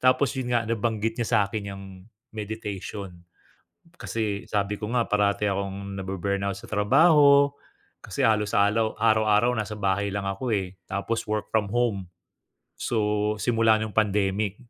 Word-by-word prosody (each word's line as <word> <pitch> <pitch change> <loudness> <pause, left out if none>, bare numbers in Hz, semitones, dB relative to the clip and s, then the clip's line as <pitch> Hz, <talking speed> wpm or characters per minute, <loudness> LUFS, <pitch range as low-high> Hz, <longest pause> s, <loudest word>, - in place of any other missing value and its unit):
Tapos 130 +1 +3
'yon 125 -2 -2
nga 120 - +3
nabanggit 115 0 -1
niya 115 - -1
sa'kin 100 0 -2
'yong 100 0 -9 0.5
meditation. 105 -2 -5 0.9
Kasi 110 -9 -3
sabi 105 0 0
ko 105 - -5
nga 120 -2 +2
parati 105 0 +1
akong 100 0 -3
nabu-burnout 95 +1 -2
sa - - -12
trabaho 140 +6 +5 0.5
kasi - - -4
halos 105 -2 +2
alaw 110 +2 +2
araw-araw 110 +1 +3
nasa 105 -2 -4
bahay 100 0 0
lang 100 0 -3
ako 95 +6 -3
eh, 95 -2 -3 0.2
tapos 115 +3 -2
work 105 0 -3
from 110 -2 +2
home, 110 -5 0 0.7
so 105 -2 0
simula 115 -1 +3
no'ng 110 0 -3
pandemic. 105 -1 +1
105 Hz, 140 wpm, -25 LUFS, 100-115 Hz, 0.9 s, trabaho